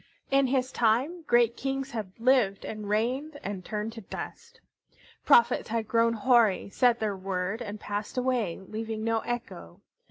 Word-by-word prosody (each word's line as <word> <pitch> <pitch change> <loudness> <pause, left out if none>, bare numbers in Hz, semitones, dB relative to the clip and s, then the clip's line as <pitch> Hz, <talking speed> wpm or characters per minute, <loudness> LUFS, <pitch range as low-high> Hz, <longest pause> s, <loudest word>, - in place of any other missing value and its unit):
In 275 0 +4
his 260 0 0
time 255 +11 +1
great 240 -1 +4
kings 270 +1 -3
had 215 -5 -5
lived 230 -5 +2
and 215 -2 -6
reigned 260 +8 -1
and 195 -2 -5
turned 215 +3 -4
to 225 - -8
dust. 470 - -8 0.7
Prophets 470 - +5
had 225 -1 -1
grown 230 +1 +3
hoary, 230 -4 +3
said 245 0 +3
their 210 -2 -1
word, 190 +3 -3
and 210 -2 -6
passed 205 +4 -5
away, 250 -8 0
leaving 220 +3 -5
no 225 0 +1
echo. 240 +1 -6
230 Hz, 155 wpm, -28 LUFS, 210-255 Hz, 0.7 s, Prophets